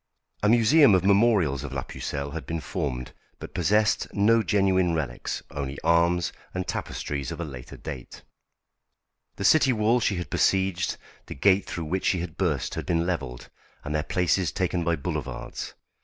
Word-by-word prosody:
A 105 - +3
museum 120 +1 +6
of 90 0 +1
memorials 100 - +3
of 70 -2 -6
la 70 - -2
Pucelle 70 0 -5
had 80 -3 -6
been 80 0 -2
formed, 65 -3 -4 0.3
but - - -10
possessed 105 +5 +2
no 110 +3 +4
genuine 95 -5 +2
relics, 70 -7 -3
only 70 -1 -4
arms 85 +1 +2 0.2
and 95 0 -2
tapestries 70 -3 -4
of - - -6
a 85 - -2
later 65 -4 -9
date. 70 -6 -8 1.1
The 100 - -4
city 140 +4 +5
walls 115 +1 +2
she 100 - +1
had 90 -1 -5
besieged, 95 -2 +1 0.3
the - - -7
gate 100 +7 +3
through 85 - -4
which 90 +5 -2
she 95 - +2
had 85 -2 -5
burst, - - -1
had - - -5
been 85 -1 +1
levelled, 70 -9 -4 0.3
and 75 - -4
their 75 - +1
places 90 +3 +1
taken 90 -2 -1
by 85 0 +1
boulevards. 70 - -5
85 Hz, 170 wpm, -26 LUFS, 75-100 Hz, 1.1 s, museum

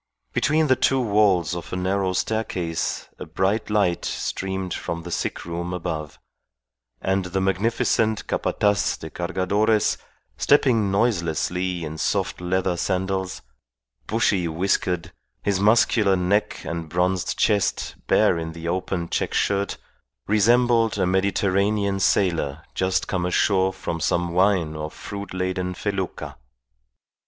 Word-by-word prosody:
Between 155 +2 +2
the 130 -3 +4
two 135 +1 +2
walls 100 -7 +2
of 85 - -7
a - - -2
narrow 95 +1 0
staircase 90 -6 -2
a - - -6
bright 100 +5 0
light 100 -5 +1
streamed 95 -1 -3
from 85 0 -4
the 90 - -7
sick - - -3
room 85 +1 -4
above; 80 -4 -4 0.8
and 95 0 0
the 90 +1 -2
magnificent 110 +3 +1
Capataz 105 -1 +1
de 80 - -9
Cargadores 100 +4 +1 0.4
stepping 120 -8 +3
noiselessly 90 -4 0
in 80 0 -6
soft 95 -1 -1
leather 90 0 0
sandals, 95 +1 -2 0.6
bushy 105 -5 +1
whiskered, 85 0 -1 0.3
his 100 -2 +1
muscular 105 -1 +4
neck 95 +3 0
and 85 -1 -4
bronzed 90 +2 0
chest 100 -2 +1
bare 85 - +4
in 80 0 -5
the 85 0 -7
open 90 0 -2
check - - -2
shirt, 100 0 0 0.5
resembled 115 +1 +3
a 95 - +2
Mediterranean 100 +1 +1
sailor 85 -7 +1
just 95 0 0
come 90 -2 -1
ashore 95 +1 +2
from 85 -2 -4
some 85 +2 0
wine 90 -4 +2
or 75 0 -4
fruit 100 +4 -8
laden 90 0 -2
felucca. 95 -2 -4
95 Hz, 125 wpm, -23 LUFS, 90-100 Hz, 0.8 s, the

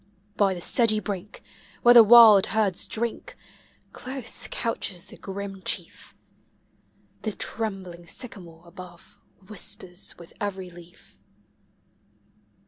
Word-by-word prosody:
By 195 -2 +2
the 175 - -8
sedgy 220 +2 +2
brink, 205 -1 -7 0.4
where 240 - +8
the 235 -1 +10
wild 220 -3 +8
herds 210 -5 -1
drink. 235 - -4 0.5
close 255 -2 -4
conches 195 -6 -4
the - - -14
grim 195 0 -7
chief; - - -4 1.1
The 215 - -3
trembling 190 -7 -5
sycamore 175 -7 -8
above 180 +2 -14 0.3
whispers 185 -2 -5
with 170 -1 -14
every 190 -3 -4
leaf. 175 0 -16
200 Hz, 105 wpm, -25 LUFS, 180-220 Hz, 1.1 s, the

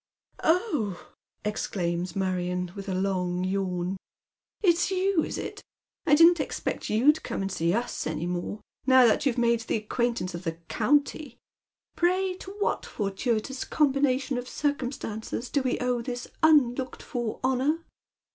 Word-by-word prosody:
*' - - -42
Oh! 310 - 0
" - - -25
exclaims 180 -4 -2
Marion, 180 -2 -1
with 200 0 -6
a 185 - -1
long 185 -2 0
yawn, 185 -1 -1 0.3
" - - -66
It's 345 -2 +4
you, 380 -3 +2
is - - -4
it? - - -6 0.5
I 295 - +7
didn't 335 +2 +7
expect - - -3
you'd 270 +9 +4
come - - -3
and 195 - -2
see 170 -2 +1
us 240 +1 -2
any 155 +1 -2
more, 180 +4 -3 0.3
now 260 -1 +7
that 230 +5 +3
you've 255 - 0
made 235 -1 +3
the 225 - -2
acquaintance 220 -3 -1
of 170 +1 -6
the 165 -2 -2 0.2
county. 285 +1 +1 0.6
Pray 370 +2 +2
to - - -9
what 415 - 0
fortuitous 220 +5 -2
combination 275 -3 +1
of 245 - -7
circumstances 250 -5 -3
do 285 - +2
we 255 -1 0
owe 250 -1 0
this 245 0 -5
unlooked 265 -5 +3
for 240 -3 -3
honour 270 +6 +1
240 Hz, 155 wpm, -27 LUFS, 195-285 Hz, 0.6 s, I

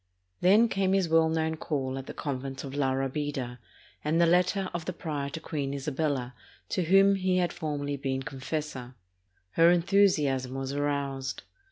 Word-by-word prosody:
Then 210 +6 +5
came 195 -3 +1
his 195 -3 +2
well 160 0 +4
known 160 0 0
call 135 -5 -2
at 135 - -9
the - - -6
convent 135 -1 -4
of 135 -1 -7
La 140 -2 +1
Rabida 135 -2 -2 0.4
and 155 +3 +1
the 170 - +6
letter 180 +3 +2
of 170 -2 -4
the 185 - -3
prior 150 -5 -4
to 160 - -6
Queen 140 -3 -3
Isabella, 140 -2 -2 0.4
to 185 - 0
whom 195 +3 +6
he 185 -1 +1
had 175 -1 +1
formerly 145 -2 -3
been 135 -1 -2
confessor. 130 -2 -5 0.6
Her 165 +1 +5
enthusiasm 170 -8 +2
was 135 0 -3
aroused. 140 -2 -2
150 Hz, 165 wpm, -28 LUFS, 135-170 Hz, 0.6 s, the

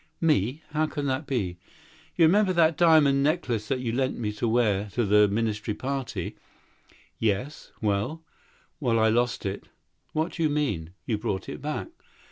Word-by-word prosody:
"Of - - -7
me! 140 +2 +1
How 155 0 0
so?" 140 -1 -2
"Do 135 - -1
you 90 -7 -1 0.6
remember 185 +4 +4
that 165 -2 +4
diamond 155 -4 +5
necklace 135 -8 0
you 125 -3 -1
lent 130 +2 0
me 105 -3 -2
to 105 +3 -2
wear 110 -4 +2
at 100 - -14
the 105 -3 +4
ministerial 105 0 -1
ball?" 135 0 -2 1.1
"Yes. 115 +7 -2
Well?" 105 +11 -1 0.6
"Well, 120 -5 +1
I 110 0 +4
lost 120 +1 0
it." 100 +1 -4 0.5
"What 160 +3 0
do 170 - -6
you 155 - +3
mean? 105 - -1
You 110 -3 -1
brought 100 -4 -3
it - - -7
back." 150 - -3
125 Hz, 160 wpm, -26 LUFS, 105-150 Hz, 1.1 s, diamond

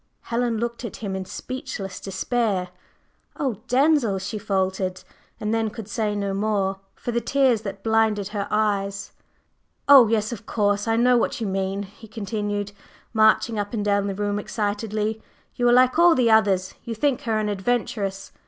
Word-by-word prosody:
Helen 235 -1 -1
looked 235 +2 -3
at 235 - -5
him 200 -3 -4
in 190 0 -4
speechless 255 -4 -6
despair. 195 -2 -1 0.7
"Oh, 260 -8 -2
Denzil!" 260 -5 +3
she 200 +3 -4
faltered, 190 -2 -1 0.4
and 215 +1 -1
then 225 -1 +1
could 215 -1 -8
say 210 0 -1
no 200 -1 -2
more, 195 -1 0 0.2
for 240 - -4
the 235 0 0
tears 260 -5 +2
that 195 -2 -7
blinded 220 -3 +2
her 205 -1 -3
eyes. 200 -2 -1 0.8
"Oh, 275 -5 +9
yes, 215 0 0
of 225 -2 -8
course, 205 -1 0
I 225 - +2
know 245 +1 +4
what 235 - 0
you 225 - -2
mean!" 195 0 -2
he 205 +3 -13
continued, 205 -1 -3 0.4
marching 220 0 +3
up 205 +3 -3
and 210 -2 -2
down 200 -1 +2
the 195 - -3
room 205 0 -1
excitedly. 215 +1 -2 0.3
"You 245 0 +2
are - - +5
like 255 +4 +5
all 340 -1 +7
the 240 -4 +3
others; 195 -4 +3
you 230 - -5
think 270 +3 +1
her 225 -2 0
an 215 -1 0
adventuress. 200 -2 -2
215 Hz, 170 wpm, -24 LUFS, 200-235 Hz, 0.8 s, Oh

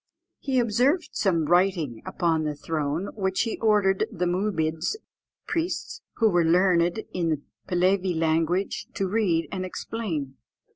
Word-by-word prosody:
He 265 -2 -1
observed 250 - +2
some 170 -6 +1
writing 175 - +2
upon 165 -3 +1
the 150 -1 -2
throne, 155 +4 -2
which 190 -2 0
he 230 - -2
ordered 205 -4 +3
the 180 - -2
Moobids 175 - 0 0.5
(priests), 355 +8 -2
who 225 - +3
were 175 -4 +3
learned 175 +3 +3
in 170 -2 0
the 155 -3 -1 0.3
Pehlevee 185 -1 +1
language, 165 +4 0
to 195 - 0
read 185 -5 +1
and 185 -1 -3
explain. 170 - -4
180 Hz, 135 wpm, -26 LUFS, 165-205 Hz, 0.5 s, ordered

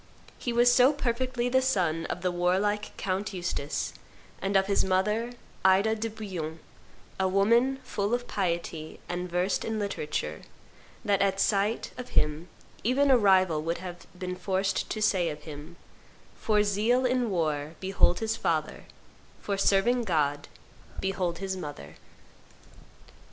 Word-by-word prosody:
He 245 - -2
was 240 +1 +5
so 255 +4 +6
perfectly 250 -2 -1
the 260 +1 +3
son 180 -11 0
of 180 - -4
the 180 - +1
warlike 190 +4 0
Count 195 +2 -2
Eustace, 175 -5 -3 0.5
and 195 +1 -1
of 190 - +3
his 200 0 +2
mother, 210 +6 0 0.3
Ida 190 +4 +4
de 225 +1 -3
Bouillon, 185 -8 -5 0.6
a 190 - +2
woman 230 +8 +3
full 205 +3 -1
of 245 0 -5
piety, 170 -4 -3
and 180 +1 -3
versed 180 +3 0
in 220 -1 -2
literature, 200 -7 -3 0.6
that 200 -2 +2
at 195 -1 +1
sight 205 +3 +1
of 250 - -6
him 150 +3 +1 0.4
even 275 +4 +3
a 260 - +7
rival 185 -6 +4
would 165 +2 -2
have 175 -1 -8
been 180 0 -4
forced 190 +1 -1
to 215 - -2
say 185 -5 +2
of 150 -1 -7
him, 150 +2 -9 0.6
'For 210 -1 +2
zeal 220 +5 +2
in 250 -2 +1
war, 155 -4 -1
behold 190 -1 +2
his 225 0 0
father; - - -1 0.5
for 200 - -2
serving 205 +5 +3
God, 145 -5 0 0.5
behold 185 -3 -1
his 190 0 -3
mother. 145 - -7
195 Hz, 145 wpm, -28 LUFS, 175-220 Hz, 0.6 s, a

